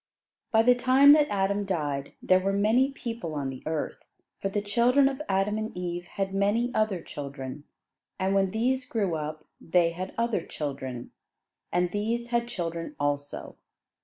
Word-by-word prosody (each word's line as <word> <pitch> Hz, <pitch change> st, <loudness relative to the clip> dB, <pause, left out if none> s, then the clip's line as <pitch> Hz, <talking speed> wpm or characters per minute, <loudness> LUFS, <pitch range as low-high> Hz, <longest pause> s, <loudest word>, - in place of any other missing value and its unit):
By 225 Hz, 0 st, +5 dB
the 250 Hz, +2 st, +6 dB
time 260 Hz, +3 st, +7 dB
that 300 Hz, -1 st, +5 dB
Adam 200 Hz, 0 st, +1 dB
died, 145 Hz, -7 st, -2 dB
there 185 Hz, 0 st, +5 dB
were 195 Hz, +1 st, 0 dB
many 220 Hz, +7 st, +3 dB
people 230 Hz, -, -5 dB
on 140 Hz, -2 st, -2 dB
the 130 Hz, -, -9 dB
earth; 160 Hz, -1 st, -2 dB, 0.4 s
for 195 Hz, -, 0 dB
the 205 Hz, -, -1 dB
children 240 Hz, +7 st, +3 dB
of 270 Hz, +1 st, -2 dB
Adam 195 Hz, +2 st, +1 dB
and 220 Hz, -3 st, -5 dB
Eve 175 Hz, -1 st, -3 dB
had 195 Hz, +1 st, -3 dB
many 210 Hz, +5 st, +1 dB
other 210 Hz, -6 st, 0 dB
children; 140 Hz, 0 st, -7 dB, 0.5 s
and 190 Hz, +1 st, 0 dB
when 195 Hz, -1 st, +3 dB
these 250 Hz, +6 st, 0 dB
grew 215 Hz, -8 st, -1 dB
up 155 Hz, 0 st, -5 dB, 0.2 s
they 170 Hz, 0 st, +3 dB
had 185 Hz, +3 st, -6 dB
other 230 Hz, -6 st, 0 dB
children; 130 Hz, -6 st, -5 dB, 0.6 s
and 175 Hz, 0 st, +1 dB
these 230 Hz, +4 st, -2 dB
had 235 Hz, 0 st, +1 dB
children 170 Hz, -, -4 dB
also. 145 Hz, 0 st, -3 dB
195 Hz, 160 wpm, -27 LUFS, 165-235 Hz, 0.6 s, time